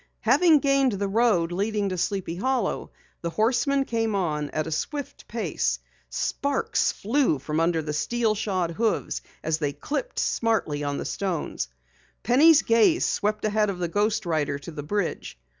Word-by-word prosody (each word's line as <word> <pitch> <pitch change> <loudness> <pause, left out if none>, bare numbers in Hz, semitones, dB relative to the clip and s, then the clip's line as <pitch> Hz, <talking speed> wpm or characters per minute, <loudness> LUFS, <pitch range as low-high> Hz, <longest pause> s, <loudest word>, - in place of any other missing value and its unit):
Having 325 -5 +5
gained 275 -3 +3
the 200 0 -1
road 200 -5 +2
leading 205 +2 -1
to 185 - -2
Sleepy 190 -2 -2
Hollow, 260 +7 -1 0.3
the 170 - -2
horseman 260 - +1
came 225 -3 -1
on 150 -6 -1
at 155 -1 -2
a 160 - -5
swift 285 - -4
pace. - - -1 0.3
Sparks 280 -1 0
flew 235 - +1
from 150 +3 -4
the 160 -3 -2
steel 225 +8 +1
shod 190 -5 -1
hoofs 220 +6 -1 0.2
as 160 0 0
they 145 -2 -1
clipped 305 - -4
smartly 200 -11 0
on 145 0 -2
the - - -4
stones. 180 - -2 0.6
Penny's 300 +6 +6
gaze 230 +9 +4
swept 210 +1 0
ahead 215 0 +2
of 195 - -3
the 175 -1 -1
ghost 205 +4 0
rider 150 -4 0
to 145 +4 -9
the 150 -2 -6
bridge. 175 - -3
205 Hz, 160 wpm, -25 LUFS, 165-240 Hz, 0.6 s, Penny's